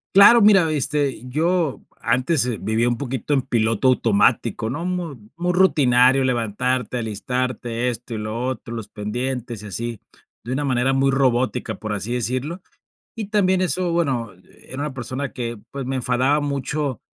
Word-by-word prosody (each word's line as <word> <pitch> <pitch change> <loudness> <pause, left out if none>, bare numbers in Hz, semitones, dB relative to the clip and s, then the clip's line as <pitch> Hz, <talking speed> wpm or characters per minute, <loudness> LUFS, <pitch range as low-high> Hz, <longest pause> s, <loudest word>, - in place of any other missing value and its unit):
Claro, 225 +4 +9
mira, 195 -6 +6
este, 145 -3 0
yo 160 +2 0 0.2
antes, 130 +4 +2
eh, 120 -3 -2
vivía 110 +4 +1
un 120 - -1
poquito 135 +1 -3
en 135 - +3
piloto 115 -1 +1
automático, 115 -1 +2
¿no?, 165 +8 -4
mu 180 -5 -3 0.2
muy 175 +1 -1
rutinario, 135 -7 +4
levantarte, 125 +1 -1
alistarte, 120 +1 -2
esto, 120 0 -6
y - - -3
lo 110 +2 -4
otro, 130 -2 -4
los 115 -3 -5
pendientes, 120 +1 -4
y - - -8
así, 115 +3 -4 0.4
de 125 +3 -4
una 145 - -1
manera 130 0 +1
muy 135 0 +3
robótica, 130 -2 +1
por 110 -1 -5
así 105 +4 -3
decirlo. 130 - -2 0.5
Y 220 -3 -4
también 190 -3 +2
eso, 180 -1 0
bueno, 130 - 0 0.3
era 130 +2 -7
una 150 -1 -3
persona 130 +2 -4
que, 120 -2 -4
pues, 135 -2 -5
me 135 - -2
enfadaba 130 +4 +1
mucho, 140 -1 -2
130 Hz, 160 wpm, -22 LUFS, 120-145 Hz, 0.5 s, Claro